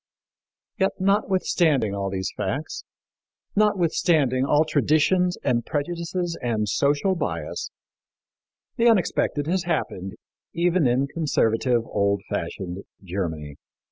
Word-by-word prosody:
Yet, 190 - +2
notwithstanding 185 - +2
all 100 -1 -2
these 95 -1 -3
facts, - - -4 0.7
notwithstanding 165 -10 +2
all 150 +3 +3
traditions 155 +5 +2
and 120 -1 +1
prejudices 170 +4 -3
and 110 -4 -1
social 145 - +2
bias, 85 - -3 1.1
the 235 - +4
unexpected 180 -8 +2
has 180 +3 0
happened, 95 - -2 0.4
even 170 -3 +2
in 125 +3 +2
conservative, 125 -6 +1
old 100 -2 0
fashioned 90 +2 -4 0.2
Germany. 80 -6 -4
145 Hz, 100 wpm, -24 LUFS, -, 1.1 s, the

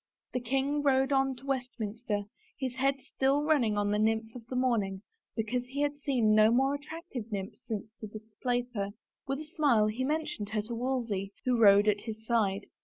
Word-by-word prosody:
The 250 - +1
king 270 +4 0
rode 270 -1 +3
on 270 -1 +2
to 250 +2 -12
Westminster, 235 -5 -2 0.4
his 260 -3 -2
head 275 +1 +3
still 275 +3 +1
run 305 -2 +4
ning 215 -3 +1
on 205 0 +1
the 210 - +1
nymph 220 +1 +1
of 235 -2 -10
the 255 - -5
morning 215 -7 +1 0.3
because 235 +2 -1
he 275 +3 -3
had 290 0 +1
seen 260 -7 +2
no 215 0 +6
more 265 +4 +3
attractive 285 - -6
nymph 195 -1 -3
since 215 -1 -4
to 215 - -6
displace 240 +4 -3
her. 200 -2 -2 0.3
With 275 +2 -2
a - - -7
smile 290 - +3
he 215 +4 -1
mentioned 300 -7 -2
her 210 0 -1
to 235 +3 -6
Wolsey, 230 -5 -2
who 250 -1 +3
rode 205 -2 +7
at 205 -1 +3
his 220 -1 -7
side. 210 -4 +1
240 Hz, 195 wpm, -30 LUFS, 215-270 Hz, 0.4 s, rode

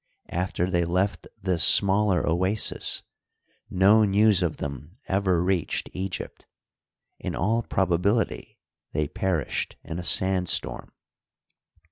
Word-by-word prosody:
After 90 0 -1
they 85 -1 +1
left 90 +4 -1
this 90 -5 +1
smaller 100 +4 +4
oasis 95 +6 0 0.7
no 100 +4 +4
news 105 -1 +3
of 85 -3 -1
them 70 +3 -7
ever 95 -3 +1
reached 90 -3 -1
Egypt; 95 -1 -6 0.7
in - - -5
all 110 +6 0
probability 100 +2 -1 0.4
they 75 0 0
perished 90 -1 -2
in 80 +1 -6
a - - -5
sand 90 +1 +3
storm. - - -2
95 Hz, 110 wpm, -25 LUFS, 85-100 Hz, 0.7 s, smaller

